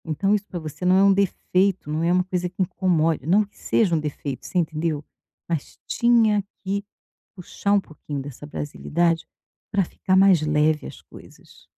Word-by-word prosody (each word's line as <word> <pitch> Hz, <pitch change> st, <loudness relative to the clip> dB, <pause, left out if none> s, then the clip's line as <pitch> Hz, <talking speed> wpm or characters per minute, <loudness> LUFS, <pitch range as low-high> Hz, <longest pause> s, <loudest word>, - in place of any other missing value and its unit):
Então, 195 Hz, +6 st, 0 dB
isso 205 Hz, -1 st, -1 dB
para 175 Hz, -, -5 dB
você 155 Hz, 0 st, -8 dB
não 180 Hz, +1 st, +5 dB
é 195 Hz, -, +5 dB
um 200 Hz, 0 st, +6 dB
defeito, 190 Hz, -2 st, +1 dB
não 155 Hz, +2 st, -1 dB
é 170 Hz, -, +2 dB
uma 180 Hz, 0 st, +3 dB
coisa 180 Hz, -1 st, -2 dB
que 180 Hz, +2 st, -5 dB
incomode 165 Hz, -5 st, +1 dB
não 200 Hz, +5 st, +4 dB
que 205 Hz, -, -17 dB
seja 190 Hz, -7 st, +1 dB
um -, -, +1 dB
defeito, 145 Hz, -3 st, -5 dB
você -, -, -4 dB
entendeu? 155 Hz, -2 st, -1 dB, 0.4 s
Mas 165 Hz, -4 st, -4 dB
tinha 225 Hz, -4 st, +3 dB, 0.2 s
que 200 Hz, +1 st, -2 dB, 0.5 s
puxar 200 Hz, +2 st, -2 dB
um 205 Hz, -, +4 dB
pouquinho 150 Hz, -4 st, -7 dB
dessa 145 Hz, +1 st, -9 dB
brasilidade 165 Hz, +3 st, -1 dB, 0.5 s
para 195 Hz, -2 st, +2 dB
ficar 185 Hz, +2 st, -1 dB
mais 190 Hz, -4 st, +6 dB
leve 155 Hz, 0 st, +1 dB
as -, -, -11 dB
coisas. -, -, -17 dB
175 Hz, 180 wpm, -23 LUFS, 155-195 Hz, 0.5 s, um